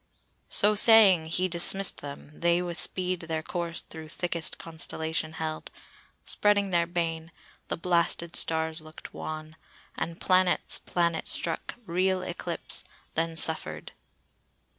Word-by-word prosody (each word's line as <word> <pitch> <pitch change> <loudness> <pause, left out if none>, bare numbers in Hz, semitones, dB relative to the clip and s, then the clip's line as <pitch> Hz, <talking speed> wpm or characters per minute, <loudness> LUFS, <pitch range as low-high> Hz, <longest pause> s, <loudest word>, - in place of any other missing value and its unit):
"So 210 +1 +6
saying, 205 -6 +6
he 180 +3 +1
dismiss'd 185 +2 +2
them; 145 0 -9
they 170 0 +2
with 175 -1 -4
speed 185 -1 +1
Their 160 -1 -4
course 170 -1 -3
through 160 -1 -10
thickest 170 0 -1
constellation 160 -1 -1
held, 160 -1 -5 0.6
Spreading 205 -1 +3
their 170 -1 +2
bane; 165 -1 -3 0.4
the - - -3
blasted 170 -1 0
stars 160 0 0
look'd 155 0 -12
wan, 155 0 -7 0.4
And 165 0 -5
planets, 185 -1 +2
planet 170 -2 -1
struck, - - -1
real 185 +1 0
eclipse, 175 -1 -2 0.3
Then 165 0 -2
suffer'd." 80 - -1
170 Hz, 120 wpm, -27 LUFS, 160-180 Hz, 0.6 s, So